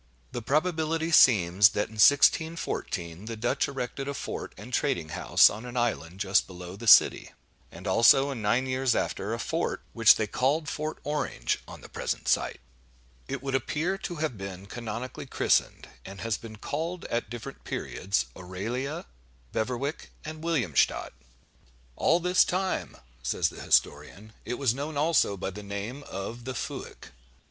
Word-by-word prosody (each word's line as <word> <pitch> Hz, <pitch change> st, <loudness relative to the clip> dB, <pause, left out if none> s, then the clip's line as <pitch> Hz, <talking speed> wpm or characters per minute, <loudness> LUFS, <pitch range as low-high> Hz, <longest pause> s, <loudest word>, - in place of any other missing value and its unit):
The 120 Hz, -, -4 dB
probability 160 Hz, +4 st, 0 dB
seems, 100 Hz, -, +6 dB
that, 105 Hz, -, 0 dB
in 110 Hz, -1 st, -2 dB
1614, 110 Hz, -, +2 dB
the 115 Hz, 0 st, -5 dB
Dutch 120 Hz, +3 st, 0 dB
erected 135 Hz, 0 st, -4 dB
a 140 Hz, -, -3 dB
fort -, -, -5 dB
and 115 Hz, +6 st, -10 dB
trading 130 Hz, -, 0 dB
house -, -, +5 dB
on 105 Hz, +3 st, -4 dB
an 125 Hz, 0 st, -7 dB
island 95 Hz, -7 st, -1 dB
just 95 Hz, -1 st, +2 dB
below 90 Hz, 0 st, -9 dB
the 115 Hz, +3 st, -8 dB
city; 105 Hz, -, +6 dB, 0.4 s
and 85 Hz, +3 st, -11 dB
also, 115 Hz, +8 st, +5 dB
in 125 Hz, -5 st, -5 dB
nine 115 Hz, +5 st, +2 dB
years 130 Hz, -1 st, +1 dB
after, 100 Hz, +3 st, -2 dB
a 115 Hz, -, -1 dB
fort, 115 Hz, -, -2 dB
which -, -, +7 dB
they -, -, 0 dB
called 145 Hz, +4 st, 0 dB
Fort 155 Hz, +2 st, -3 dB
Orange, 145 Hz, -, -1 dB
on -, -, -10 dB
the -, -, -11 dB
present -, -, -4 dB
site. -, -, +1 dB, 0.7 s
It 140 Hz, -1 st, -5 dB
would 135 Hz, -1 st, -3 dB
appear 150 Hz, +8 st, 0 dB
to 175 Hz, -, -5 dB
have 150 Hz, -9 st, -3 dB
been 95 Hz, -1 st, -7 dB
canonically 115 Hz, +3 st, -6 dB
christened, -, -, +1 dB, 0.2 s
and 95 Hz, 0 st, -10 dB
has 115 Hz, -2 st, 0 dB
been 110 Hz, +1 st, -9 dB
called 160 Hz, +10 st, -4 dB
at 115 Hz, -3 st, -2 dB
different 120 Hz, 0 st, -8 dB
periods 100 Hz, +3 st, -2 dB
Auralia, 110 Hz, +10 st, -4 dB, 0.5 s
Beverwyck, 125 Hz, +6 st, -2 dB, 0.2 s
and 155 Hz, 0 st, -7 dB
Williamstadt. 130 Hz, -, +1 dB, 0.8 s
"All 170 Hz, -, +3 dB
this 180 Hz, +1 st, +4 dB
time," 185 Hz, +1 st, -2 dB, 0.2 s
says -, -, 0 dB
the -, -, -10 dB
historian, 95 Hz, +9 st, 0 dB
"it 125 Hz, -, -2 dB
was 130 Hz, -3 st, +1 dB
known 145 Hz, +3 st, -5 dB
also 150 Hz, -9 st, +2 dB
by 95 Hz, -, -4 dB
the 105 Hz, +3 st, -8 dB
name 100 Hz, +7 st, -5 dB
of 115 Hz, +5 st, -6 dB
'The 130 Hz, -1 st, -4 dB
Fuyck. -, -, -7 dB
120 Hz, 160 wpm, -28 LUFS, 100-145 Hz, 0.8 s, which